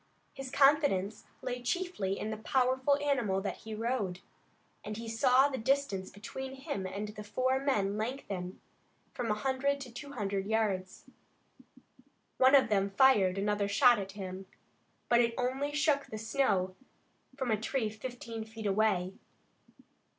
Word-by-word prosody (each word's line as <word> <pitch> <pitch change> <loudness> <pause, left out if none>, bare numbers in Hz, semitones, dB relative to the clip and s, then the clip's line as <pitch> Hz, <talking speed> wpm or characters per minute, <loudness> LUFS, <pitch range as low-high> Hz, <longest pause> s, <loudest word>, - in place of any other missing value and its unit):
His 270 -1 -7
confidence 275 -8 +3 0.2
lay 250 0 -3
chiefly 250 - -1
in 215 - -3
the 215 - -4
powerful 260 +4 +2
animal 265 -10 +1
that 195 - -3
he 220 -1 -7
rode, 215 -5 -2 0.6
and 210 0 -5
he 230 0 -6
saw 255 +4 +4
the 265 -2 -4
distance 225 -6 0
between 265 +6 -7
him 265 - -4
and 205 +3 -4
the 210 0 -8
four 255 +5 0
men 210 -8 0
lengthen 200 -6 -4 0.5
from 240 -2 -3
a 210 - +2
hundred 270 +4 0
to 255 -3 -8
two 280 +4 -8
hundred 200 -5 -2
yards. 205 -4 -1 1.4
One 260 +2 +7
of 265 -3 +6
them 200 -2 +2
fired 195 -4 +4
another 205 0 0
shot 240 +3 +5
at 195 -1 -6
him, 190 -1 -7 0.6
but 240 0 +5
it 230 -1 +1
only 265 +3 -1
shook 300 -1 +1
the 215 - -6
snow 215 -5 0 0.6
from 260 -4 -1
a 215 -1 +1
tree 235 0 0
fifteen 230 0 -6
feet 220 0 -9
away. 195 -2 +1
225 Hz, 150 wpm, -31 LUFS, 200-265 Hz, 1.4 s, One